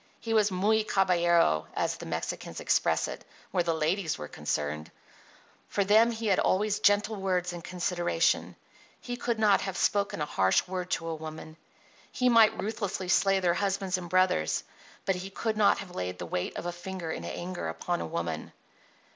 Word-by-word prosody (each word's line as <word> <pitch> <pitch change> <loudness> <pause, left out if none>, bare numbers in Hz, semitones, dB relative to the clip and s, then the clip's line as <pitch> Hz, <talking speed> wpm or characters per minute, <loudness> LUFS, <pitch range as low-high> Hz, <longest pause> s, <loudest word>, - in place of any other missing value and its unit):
He 225 - -3
was 215 -2 +4
muy 210 +4 +2
caballero, 170 - +3
as - - -1
the - - -8
Mexicans - - -4
express - - +2
it, - - -7 0.3
where 180 - +2
the 165 -1 0
ladies 160 +2 0
were 75 - -6
concerned. 75 +2 -3 0.8
For 200 - 0
them 215 +4 +5
he 230 -1 -4
had 200 -3 +3
always 205 +2 +1
gentle 205 +1 +3
words 180 -2 -1
and 170 -1 -7
consideration. 175 -2 0 0.4
He 245 - -5
could 235 -1 -2
not 210 -2 +4
have 195 -2 -4
spoken 205 -1 +1
a 150 - 0
harsh 95 - +2
word 180 -1 -4
to 165 - -10
a 165 - -2
woman. 155 0 -8 0.6
He 250 0 +2
might 225 -2 +5
ruthlessly 200 -3 -3
slay 195 0 +3
their 175 -2 +3
husbands 195 0 0
and 175 -1 -8
brothers, 185 - +2 0.4
but 190 -2 +1
he 185 +2 -6
could 220 +3 -2
not 210 -1 +4
have 190 -3 -8
laid 90 0 -3
the 90 - -5
weight 90 +1 -3
of - - -5
a 175 - -1
finger 175 -1 -6
in - - -5
anger 180 +1 -5
upon 175 -1 -2
a - - -3
woman. 80 -1 -4
185 Hz, 180 wpm, -29 LUFS, 165-205 Hz, 0.8 s, them